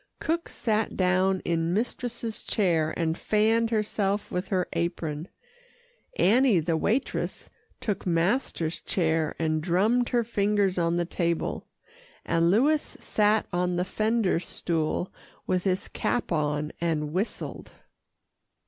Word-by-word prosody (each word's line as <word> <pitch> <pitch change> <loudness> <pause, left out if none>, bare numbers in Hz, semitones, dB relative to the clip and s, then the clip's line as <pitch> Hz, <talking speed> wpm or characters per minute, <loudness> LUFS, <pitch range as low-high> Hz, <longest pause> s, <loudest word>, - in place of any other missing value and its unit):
Cook 335 +1 -1
sat 220 -2 -1
down 185 +1 +2
in 165 +1 0
mistress's 235 0 -2
chair 165 -6 +1
and 160 -1 0
fanned 220 +4 +2
herself 210 -2 -1
with 180 +2 -2
her 185 -3 0
apron, 165 -2 -2 0.9
Annie 235 -1 +4
the 165 +1 0
waitress 225 - -1 0.3
took 205 -3 -3
master's 170 -1 0
chair 160 -3 0
and 155 -1 0
drummed 210 +9 +2
her 240 -1 +2
fingers 205 -4 +1
on 170 0 +1
the 175 - +1
table, 170 -1 -2 0.6
and 165 0 +2
Louis 285 - +4
sat 215 0 0
on 180 0 +1
the 180 +1 0
fender 215 -2 +1
stool 170 0 -2 0.3
with 185 0 0
his 190 0 0
cap 245 - -2
on 150 -1 0
and 155 -3 -1
whistled. 195 +6 -3
185 Hz, 120 wpm, -27 LUFS, 170-215 Hz, 0.9 s, Annie